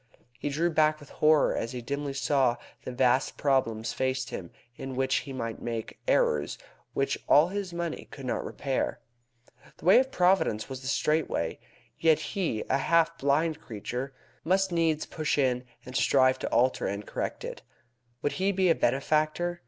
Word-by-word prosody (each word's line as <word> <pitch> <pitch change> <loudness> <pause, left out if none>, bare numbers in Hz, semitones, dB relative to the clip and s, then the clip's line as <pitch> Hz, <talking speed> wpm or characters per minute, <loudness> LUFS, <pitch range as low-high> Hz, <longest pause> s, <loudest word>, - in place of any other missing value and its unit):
He 145 - -2
drew 165 +4 0
back 155 -1 +3
with 145 - -14
horror 155 -1 +3
as 115 - -3
he 125 - -4
dimly 140 +2 -3
saw 135 -3 +2 0.3
that - - -5
vast 130 +1 +2
problems 120 -5 +1
faced 130 -1 -1
him 85 -3 -6 0.3
in 135 +1 -6
which 130 +1 +1
he 140 - -5
might 115 -4 -4
make 115 -2 -5
errors - - +2 0.4
which 135 - 0
all 150 +4 +6
his 200 -1 -4
money 170 -1 -4
could 135 - -9
not 125 - -1
repair. 135 -2 -2 0.8
The - - -14
way 185 +6 +8
of 265 +1 0
Providence 180 - +2
was 130 -1 -7
the 130 - -7
straight 155 +3 +1
way. - - -2 0.4
Yet 160 -2 +5 0.2
he, 170 - -1
a 135 - +1
half 165 +3 +3
blind 155 +3 +1
creature, 125 +4 -5 0.3
must 190 +2 +2
needs 165 -2 +1
push 155 -2 -2
in 125 -3 +1 0.2
and 125 - -9
strive 130 -1 +4
to - - -3
alter 130 +2 +2
and 100 +2 -4
correct - - -4
it. - - -7 0.6
Would 145 - +1
he 195 +1 +3
be 185 -2 +3
a - - +6
benefactor? 155 +6 0
140 Hz, 175 wpm, -28 LUFS, 130-165 Hz, 0.8 s, way